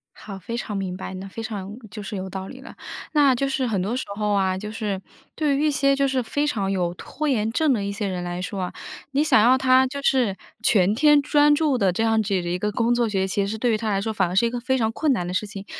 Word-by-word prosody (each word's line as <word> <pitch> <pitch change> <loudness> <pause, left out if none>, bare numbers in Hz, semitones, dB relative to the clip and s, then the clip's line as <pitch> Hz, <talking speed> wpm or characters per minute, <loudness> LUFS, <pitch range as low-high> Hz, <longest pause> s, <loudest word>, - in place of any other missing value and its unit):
好， 195 -2 -9
非 230 +5 -6
常 215 -3 -4
明 185 -2 -3
白， 190 - -6
那 190 +1 -7
非 210 +4 -7
常 205 -3 -5 0.2
就 205 +3 -8
是 205 - -6
有 190 0 -5
道 190 0 -6
理 260 - -10
了。 270 - -12 0.4
那 285 -3 +5
就 275 +3 0
是 270 -1 -1
很 210 -6 0
多 210 +6 -2
时 260 - -2
候 210 0 -1
啊， 190 -1 +1
就 210 +2 -6
是 210 -4 -3 0.3
对 295 -3 +1
于 300 - +1
一 300 - +3
些 275 -1 +2
就 275 0 +2
是 260 -1 0
非 290 +6 -1
常 200 -9 -1
有 175 -3 -1
拖 305 +11 -5
延 225 -6 +1
症 305 +4 +2
的 205 -4 -1
一 200 - -2
些 200 0 -3
人 180 -2 -3
来 175 0 -4
说 195 +1 -4
啊， 180 - -5 0.4
你 285 +2 +2
想 310 - +5
要 250 +4 +5
他 260 0 +4
就 280 +2 -6
是 245 -8 +2 0.3
全 200 -3 +3
天 295 +4 +5
专 295 +1 +4
注 290 -3 +1
的 195 -5 +2
这 200 +6 -1
样 225 -1 +3
子 210 - -4
的 175 - -3
一 180 +1 -2
个 210 +1 -1
工 235 +2 +1
作 240 -1 +1
学 190 -2 0
习 195 +1 -1
是 220 +2 -3
对 240 +1 +1
于 215 - +2
他 220 0 -3
来 195 -1 0
说 220 +2 -2
反 190 -3 +1
而 180 - -4
是 235 - +4
一 - - +1
个 245 0 -4
非 260 +2 0
常 220 -3 0
困 300 +5 0
难 180 -8 -2
的 180 - -4
事 210 +3 -1
情。 200 -1 -8
220 Hz, 310 characters per minute, -23 LUFS, 195-260 Hz, 0.4 s, 那